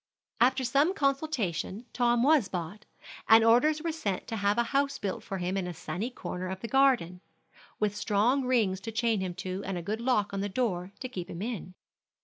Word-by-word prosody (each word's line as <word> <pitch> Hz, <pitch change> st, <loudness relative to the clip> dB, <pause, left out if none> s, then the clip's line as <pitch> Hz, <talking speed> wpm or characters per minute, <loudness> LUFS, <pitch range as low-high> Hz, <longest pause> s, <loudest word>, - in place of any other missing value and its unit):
After 260 Hz, +3 st, +3 dB
some 280 Hz, +9 st, +2 dB
consultation 270 Hz, -, -1 dB
Tom 240 Hz, -1 st, +2 dB
was 285 Hz, -6 st, +4 dB
bought, 180 Hz, +4 st, -5 dB, 0.4 s
and 225 Hz, 0 st, +8 dB
orders 295 Hz, +8 st, +4 dB
were 335 Hz, -, 0 dB
sent 205 Hz, -, -3 dB
to 225 Hz, -, -3 dB
have 205 Hz, +1 st, +1 dB
a 235 Hz, -, +4 dB
house 280 Hz, 0 st, +1 dB
built 195 Hz, -2 st, -3 dB
for 195 Hz, -4 st, -5 dB
him 180 Hz, +1 st, -2 dB
in 190 Hz, -2 st, -1 dB
a 175 Hz, -, -6 dB
sunny 180 Hz, +7 st, -4 dB
corner 185 Hz, -7 st, -5 dB
of 190 Hz, 0 st, -5 dB
the 230 Hz, -, -4 dB
garden, 235 Hz, -9 st, +2 dB, 0.6 s
with 210 Hz, -1 st, 0 dB
strong 215 Hz, +6 st, +2 dB
rings 225 Hz, -7 st, +1 dB
to 225 Hz, -, -5 dB
chain 225 Hz, -1 st, +1 dB
him 180 Hz, -2 st, -3 dB
to, 190 Hz, +1 st, -4 dB
and 195 Hz, -1 st, -3 dB
a 175 Hz, -, -5 dB
good 215 Hz, +6 st, -3 dB
lock 235 Hz, -5 st, +1 dB
on 195 Hz, -, -2 dB
the 200 Hz, +1 st, -2 dB
door 190 Hz, -5 st, -1 dB
to 255 Hz, -, -3 dB
keep 185 Hz, -8 st, -6 dB
him 170 Hz, +3 st, -5 dB
in. 210 Hz, -6 st, -5 dB
215 Hz, 205 wpm, -29 LUFS, 190-255 Hz, 0.6 s, and